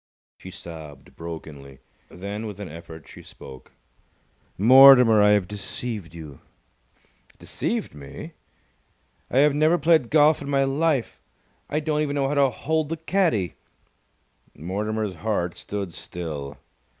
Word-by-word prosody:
She 95 - -10
sobbed 80 -6 -11
brokenly. 75 -5 -9 0.3
Then, 100 +4 -6
with 105 -2 -9
an 100 - -6
effort, 80 -2 -11
she - - -13
spoke. 65 -1 -13 0.9
"Mortimer, 125 0 +8
I 105 - +5
have 100 -3 +1
deceived 105 -3 -6
you!" 75 -5 -10 1.0
"Deceived - - -4
me?" 70 -2 -10 1.0
"I - - -1
have 145 +1 +5
never 155 +4 +3
played 155 -6 +3
golf 150 0 +4
in 140 - -6
my 135 -1 +2
life! 140 -1 -1 0.5
I 150 - -1
don't 150 0 -1
even 145 -1 -2
know 140 -1 +1
how 140 - -2
to 140 -2 +3
hold 155 +4 -2
the 165 - -3
caddie!" 160 - 0 1.0
Mortimer's 105 +5 -3
heart 95 -6 -2
stood 100 -4 -6
still. 75 -6 -7
105 Hz, 130 wpm, -24 LUFS, 85-140 Hz, 1.0 s, Mortimer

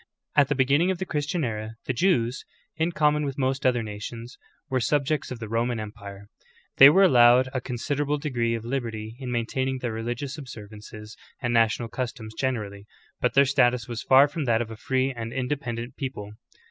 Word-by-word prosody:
2. - - +7
At 140 - +2
the - - 0
beginning 140 +7 +3
of 190 - 0
the 190 - -4
Christian 150 +1 -2
era, 110 -2 -4
the 130 - -1
Jews, 125 -6 +1 0.3
in 165 +2 0
com.mon 150 -2 +2
with 140 -2 -4
most 135 -1 0
other 120 -2 +1
nations, 115 +3 -7 0.3
were 130 -3 0
subjects 145 +3 0
of 125 - -5
the 115 -2 -7
Roman 115 +2 -1
empire.^ 100 -2 -9 0.5
They 135 - +11
were 190 +6 +5
allowed 125 -5 +6
a 130 - -2
considerable 140 +4 -2
degree 120 -6 -1
of 115 0 -6
liberty 115 -4 -4
in 130 -2 -5
maintaining 130 +3 -1
their 120 -3 -4
religious 120 +6 -4
observances 110 -3 -10 0.2
and 120 -3 -1
national 115 0 +2
customs 120 -3 -5
generally, 105 -6 -3 0.3
but - - 0
their 140 +1 +6
status 125 -4 +2
was 120 -1 -5
far 135 +2 +6
from 145 0 -4
that 115 -2 +2
of 115 -1 -4
a - - -6
free 130 +4 -1
and 115 -2 -6
independent 125 -2 -4
people. 130 -7 -5
125 Hz, 185 wpm, -25 LUFS, 115-140 Hz, 0.5 s, They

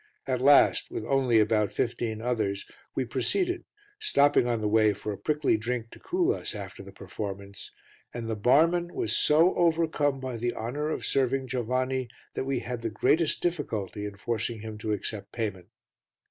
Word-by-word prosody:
At 130 -2 -1
last, 140 +2 +5
with - - -5
only 130 -4 +3
about 105 -1 +2
fifteen 115 0 -2
others, 110 -5 -1 0.3
we - - 0
proceeded, 360 -2 -1 0.3
stopping 145 - +3
on 120 -2 0
the 105 - -1
way 110 0 +4
for 105 - -5
a - - -7
prickly 150 +1 +1
drink 115 +1 -3
to - - -13
cool 365 +2 +1
us - - -4
after - - -7
the - - -11
performance, 100 -1 -7 0.4
and 120 -2 -5
the 115 - -1
barman 165 +10 +3
was 110 - 0
so 160 +4 +5
overcome 160 -5 +2
by 130 -2 -4
the 120 +1 -2
honour 145 +7 -3
of - - -3
serving 135 0 +1
Giovanni 130 +1 -1 0.3
that - - -3
we 135 -2 -1
had 120 -1 -5
the 115 - -2
greatest 155 +8 +1
difficulty 110 - -2
in 100 -1 -9
forcing 115 +1 -3
him 110 -1 -7
to 110 0 -3
accept 105 0 -4
payment. 100 -6 -4
120 Hz, 175 wpm, -28 LUFS, 110-145 Hz, 0.4 s, last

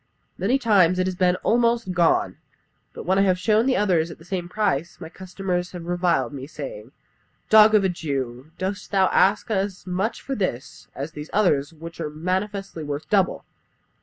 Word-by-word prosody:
"Many 215 +9 +1
times 195 -8 +3
it 185 - +1
has 185 - -1
been 180 -1 +2
almost 235 -3 +2
gone, 175 -2 +2 0.5
but - - -9
when 190 +2 +2
I - - +5
have 185 -2 +3
shown 215 +6 +2
the 260 - +2
others 175 -5 +2
at 165 - -9
the 165 - -17
same 180 -2 -4
price, 180 -6 -1
my 160 -2 -8
customers 180 0 -4
have 175 -2 -7
reviled 175 -8 0
me, 135 -1 -7
saying, - - -8 0.6
'Dog 215 0 +8
of 205 - +4
a 190 - +2
Jew, 135 -6 -4
dost 190 +2 -4
thou 190 -2 +3
ask 205 +4 +2
as 195 -3 -2
much 190 +5 -2
for 275 - -5
this 180 - -4
as 140 +4 -5
for - - -33
these 150 +1 -7
others 150 -9 +2
Which 165 +1 -11
are 155 - -3
manifestly 185 +3 -3
worth 145 0 -5
double?' 195 -3 +1
185 Hz, 190 wpm, -23 LUFS, 165-205 Hz, 0.6 s, Dog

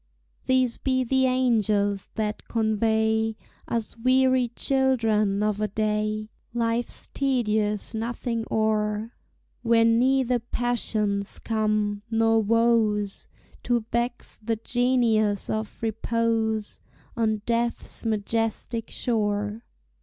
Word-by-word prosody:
These 255 -2 +2
be 260 -1 +1
the 260 +1 +2
angels 215 -6 +1
that 215 -1 -3
convey 220 0 +1 0.3
Us 230 -2 -3
weary 255 +1 +3
children 225 -6 +1
of 210 0 0
a 215 - +1
day 215 +1 -1 0.2
Life's 230 0 -1
tedious 215 -6 0
nothing 230 +1 -3
o'er 215 0 0 0.5
Where 230 -1 +4
neither 250 +2 +3
passions 220 -4 -1
come, 215 -2 0
nor 225 0 +3
woes, 220 -2 +1 0.3
To 240 -2 0
vex 240 +1 -2
the 225 +1 -1
genius 225 -3 +1
of 220 +1 -4
repose 225 -1 -1 0.4
On 220 -3 0
Death's 235 0 -2
majestic 225 +1 -1
shore. 210 -1 -1
225 Hz, 95 wpm, -25 LUFS, 215-240 Hz, 0.5 s, Where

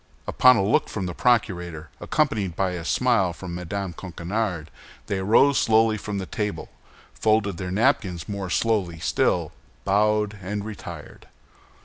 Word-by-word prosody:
Upon 125 0 +5
a 100 - +1
look 105 - +2
from 100 -3 -4
the 90 - -4
procurator, 90 - 0
accompanied 110 - 0
by 95 0 0
a 90 -2 -5
smile 100 -2 +2
from 90 +1 -8
Mme. 90 +2 -4
Coquenard, 90 -1 -4 0.3
they 100 - -2
arose 115 +8 +4
slowly 110 0 +3
from 105 -1 -4
the 95 - -3
table, 105 +2 -4 0.4
folded 110 -4 +1
their 90 0 -4
napkins 95 - 0
more 100 -2 -4
slowly 95 -5 0
still, - - 0 0.3
bowed, 105 +1 +1
and 100 +2 -4
retired. 110 -2 -9
100 Hz, 140 wpm, -24 LUFS, 90-110 Hz, 0.4 s, Upon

